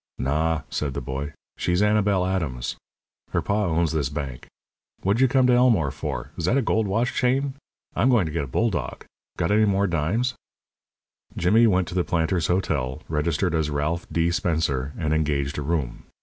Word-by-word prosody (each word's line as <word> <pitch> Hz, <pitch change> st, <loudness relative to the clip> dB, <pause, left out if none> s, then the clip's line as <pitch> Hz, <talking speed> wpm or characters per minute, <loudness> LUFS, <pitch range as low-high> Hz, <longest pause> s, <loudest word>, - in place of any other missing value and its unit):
"Naw," 75 Hz, +3 st, 0 dB
said 70 Hz, -3 st, -2 dB
the -, -, -1 dB
boy. 70 Hz, +3 st, -4 dB, 0.3 s
"She's 90 Hz, +3 st, +1 dB
Annabel 105 Hz, -3 st, +2 dB
Adams. 75 Hz, -10 st, -2 dB, 0.6 s
Her -, -, +2 dB
pa 105 Hz, +1 st, +1 dB
owns 85 Hz, -1 st, +1 dB
this 75 Hz, -5 st, 0 dB
bank. 70 Hz, -4 st, -6 dB, 0.6 s
What'd 100 Hz, +6 st, +2 dB
you 130 Hz, -, +6 dB
come 130 Hz, 0 st, +3 dB
to 125 Hz, -, +4 dB
Elmore 115 Hz, -, +4 dB
for? -, -, -5 dB
Is -, -, -2 dB
that 130 Hz, -, +2 dB
a 135 Hz, -, +2 dB
gold 110 Hz, -1 st, +1 dB
watch 115 Hz, +5 st, 0 dB
chain? 135 Hz, +2 st, +1 dB, 0.4 s
I'm 130 Hz, -, +3 dB
going 120 Hz, -8 st, +4 dB
to 80 Hz, -, -4 dB
get 80 Hz, -1 st, -1 dB
a -, -, -11 dB
bulldog. 100 Hz, -, -1 dB, 0.3 s
Got 85 Hz, 0 st, 0 dB
any 110 Hz, +1 st, +4 dB
more 100 Hz, -1 st, +2 dB
dimes?" 100 Hz, +9 st, 0 dB, 1.0 s
Jimmy 110 Hz, +7 st, +4 dB
went 95 Hz, -4 st, +2 dB
to -, -, -7 dB
the 90 Hz, -1 st, +1 dB
Planters' 85 Hz, -1 st, 0 dB
Hotel, 75 Hz, -8 st, -1 dB
registered 80 Hz, +3 st, 0 dB
as 80 Hz, -2 st, +1 dB
Ralph 75 Hz, +4 st, -2 dB
D. 85 Hz, +1 st, +1 dB
Spencer, 80 Hz, -6 st, 0 dB
and 80 Hz, -2 st, 0 dB
engaged 75 Hz, -2 st, 0 dB
a -, -, -2 dB
room. 75 Hz, -4 st, -2 dB
85 Hz, 180 wpm, -24 LUFS, 75-105 Hz, 1.0 s, you